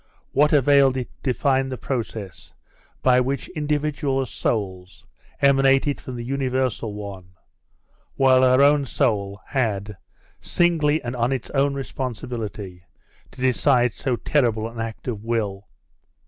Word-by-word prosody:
What 150 +2 +3
availed 140 -2 +4
it 125 - -4
to 130 - 0
define 135 0 +1
the 130 - -4
process 110 -7 -5 0.5
by 125 -1 +5
which 135 +2 -2
individual 150 -3 -1
souls 95 -6 -4 0.4
emanated 135 +1 +3
from 130 - -7
the 120 - -5
universal 130 -4 -1
one, 95 -3 -8 0.8
while 130 -1 +5
her 130 +1 +5
own 145 -1 +4
soul 105 -8 0
had, 105 -6 -1 0.4
singly 160 -3 +1
and 120 +1 -4
on 120 +1 0
its 130 -3 -3
own 140 0 +1
responsibility, 115 -8 -5 0.5
to - - -13
decide 125 -2 +3
so 130 -3 -1
terrible 115 -5 0
an 115 0 -9
act 115 +1 -6
of 110 -4 -4
will? 105 -4 -2
130 Hz, 130 wpm, -23 LUFS, 110-135 Hz, 0.8 s, by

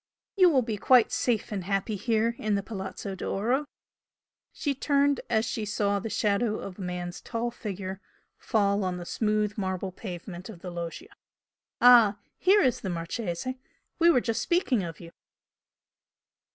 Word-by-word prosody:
You 370 -3 +6
will 265 -6 +3
be 220 -2 -3
quite 250 +2 +5
safe 230 -4 0
and 195 -4 -3
happy 200 +2 -1
here 225 +2 +1
in 215 -1 0
the 200 - -1
Palazzo 195 -1 -6
d'Oro" 235 +9 -1 0.8
she 285 - -2
turned 280 0 +2
as 220 +1 +2
she 225 - -3
saw 205 -1 0
the 225 - -5
shadow 210 +1 +1
of 190 0 -8
a - - -5
man's 180 -1 -5
tall 235 0 -3
figure 195 -4 -6 0.3
fall 200 -3 +1
on 185 -1 -2
the 175 - -7
smooth 210 +1 0
marble 190 -1 -2
pavement 180 0 -8
of 180 -6 -10
the 180 - -6
loggia 175 - -6 0.7
"Ah! 235 -4 +7 0.2
Here 395 +2 +5
is 250 - +1
the 190 - -3
Marchese! 175 +7 -3 0.4
We 340 0 +6
were 255 -7 +5
just 230 -1 -1
speaking 315 - +1
of 165 -3 -6
you!" 170 -1 -11
210 Hz, 160 wpm, -28 LUFS, 190-240 Hz, 0.8 s, Ah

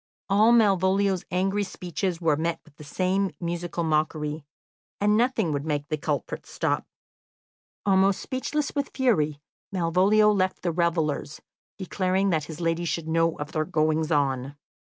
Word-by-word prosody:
All 210 +4 +5
Malvolio's 195 -3 +3
angry 195 +3 0
speeches 180 -2 -3
were 160 -4 +2
met 165 +2 -2
with 155 - -21
the - - -11
same 185 +6 0
musical 170 0 -3
mockery, 155 -1 -1 0.6
and 210 +1 +3
nothing 230 -6 +1
would 140 -1 -2
make 145 -2 -2
the 155 - 0
culprits 145 -1 -3
stop. - - -1 1.0
Almost 195 0 +3
speechless 285 +2 -3
with 280 -1 -2
fury, 155 - +1 0.3
Malvolio 190 +4 +3
left 190 -2 0
the 175 - +1
revellers, 160 -3 -1 0.4
declaring 190 0 0
that 155 -3 0
his 160 +1 -9
lady 165 0 0
should 165 -1 -2
know 165 0 +1
of 150 +1 -6
their 155 -1 0
goings 155 -1 0
on. 135 -2 0
170 Hz, 145 wpm, -26 LUFS, 155-195 Hz, 1.0 s, All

